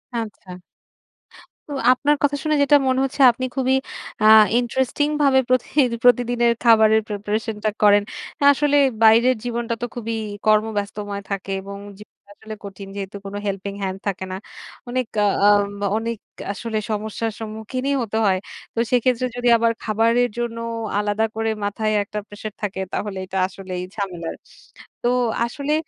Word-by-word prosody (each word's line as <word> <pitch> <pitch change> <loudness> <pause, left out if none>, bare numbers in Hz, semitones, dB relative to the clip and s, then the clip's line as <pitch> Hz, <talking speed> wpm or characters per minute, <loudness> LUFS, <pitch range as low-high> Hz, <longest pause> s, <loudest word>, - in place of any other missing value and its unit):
আচ্ছা। 205 -5 -6 1.1
তো - - -4 0.2
আপনার 290 +3 +1
কথা 290 0 +2
শুনে 310 -1 +1
যেটা 290 +1 +5
মনে 260 0 +2
হচ্ছে, 270 +1 -3
আপনি 255 +2 -4
খুবই 265 0 +2 0.5
আ - - +4 0.3
ইন্টারেস্টিং 260 +4 0
ভাবে 270 -2 +5
প্রতিহি 255 +3 +1 0.2
প্রতিদিনের 245 -1 +4
খাবারের 220 -1 +5
প্রিপারেশনটা 210 +1 -2
করেন। 205 -1 +6 0.4
আ - - +1
আসলে 290 0 +2 0.2
বাইরের 230 +3 +6
জীবনটা 235 -1 -2
তো - - 0
খুবই 230 -1 -3 0.3
কর্মব্যস্তময় 210 -1 0
থাকে 195 0 -4
এবং 200 +1 -8 0.2
জীবনটা 210 - -17
আসলে 220 0 -9
কঠিন 195 0 -9
যেহেতু 200 0 -6
কোন 195 - -7
হেল্পিং 200 0 -3
হ্যান্ড 190 0 -3
থাকে 190 -1 -2
না। - - -3 0.5
অনেক 255 -1 -1 0.2
আ - - +4 0.2
আম 205 -1 +4 0.3
অনেক 230 0 -3 0.4
আসলে 220 +1 -4
সমস্যার 220 +1 -2
সম্মুখীনই 225 +5 -3
হতে 220 -1 -3
হয়। 190 -1 +2 0.4
তো - - -1
সেক্ষেত্রে 250 0 +2
যদি 245 0 -1
আবার 230 0 +2
খাবারের 230 +3 +2
জন্য 235 -1 -3 0.4
আলাদা 210 +1 0
করে 225 0 -1 0.2
মাথায় 215 +1 -1
একটা 210 +1 -5
প্রেশার 205 0 -8
থাকে 190 -2 -3
তাহলে 205 -2 -3
এটা 190 +1 -5
আসলেই 185 -1 -6
ঝামেলার। 180 -5 -4 0.7
তো 240 - +3 0.4
আসলে 280 +5 -3
220 Hz, 145 wpm, -22 LUFS, 205-245 Hz, 1.1 s, করেন